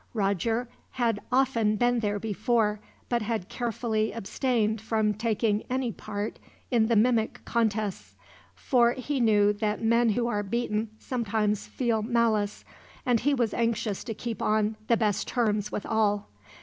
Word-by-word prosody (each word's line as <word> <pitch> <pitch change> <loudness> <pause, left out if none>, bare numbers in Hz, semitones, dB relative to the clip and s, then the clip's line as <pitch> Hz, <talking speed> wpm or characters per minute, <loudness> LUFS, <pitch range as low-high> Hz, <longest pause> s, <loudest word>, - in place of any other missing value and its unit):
Roger 220 +4 0 0.3
had 230 -4 0
often 245 -5 +2
been 245 +2 +2
there 205 -2 -1
before, 215 0 0 0.3
but 240 -1 0
had 215 -3 -3
carefully 225 -2 -1
abstained 220 0 -1
from 220 -1 +1
taking 215 0 0
any 255 -1 0
part 210 0 -5 0.3
in 230 -3 +3
the 230 - +2
mimic 225 0 +2
contests; 215 -4 -1 0.4
for 240 -3 +3
he 270 +2 -3
knew 210 -3 +4
that 210 0 -1
men 230 +1 +4
who 235 +3 +1
are 210 -3 0
beaten 215 +1 -1
sometimes 215 -4 -1
feel 235 -4 0
malice, 220 -3 0 0.4
and 245 -3 +3
he 290 +4 +2
was 235 -4 0
anxious 230 -3 -1
to 225 -3 -5
keep 235 0 -5
on 215 0 +1
the 235 - +4
best 210 -2 0
terms 210 -4 0
with - - -4
all. 205 -2 +1
220 Hz, 150 wpm, -27 LUFS, 210-235 Hz, 0.4 s, knew